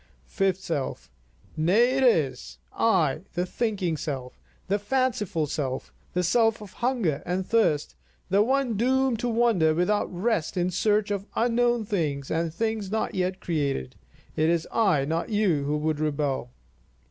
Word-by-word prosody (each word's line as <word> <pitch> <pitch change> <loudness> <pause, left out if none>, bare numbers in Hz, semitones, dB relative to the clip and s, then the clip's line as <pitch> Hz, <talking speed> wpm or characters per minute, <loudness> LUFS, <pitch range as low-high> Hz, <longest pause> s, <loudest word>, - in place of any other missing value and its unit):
Fifth 195 -2 0
Self: 160 - -4 0.4
Nay, 195 +11 +3
it 270 - +2
is 135 - +1 0.2
I, - - +2
the 175 +1 0
thinking 190 -5 -1
self, 130 -4 -5 0.3
the 200 +2 +1
fanciful 210 -7 0
self, 135 -3 -4 0.2
the 180 - +1
self 225 +5 +3
of 210 -3 -11
hunger 230 - 0
and 185 +1 -2
thirst, 200 -11 +1 0.3
the 195 +2 +3
one 260 0 +1
doomed 260 0 +2
to 245 - -1
wander 225 -9 +3
without 180 +5 +1
rest 185 -2 -1
in 180 +1 +1
search 210 +2 +1
of 200 0 -3
unknown 240 -1 +2
things 150 -9 -2
and 165 0 0
things 220 +2 -2
not 220 +2 -1
yet 185 0 -1
created; 140 - -2 0.4
it 155 +1 +2
is 170 -1 +1
I, 185 -12 +2
not 165 +7 -2
you, 195 -10 +1
who 150 +1 0
would 155 0 -1
rebel. 145 - -1
185 Hz, 150 wpm, -26 LUFS, 155-225 Hz, 0.4 s, Nay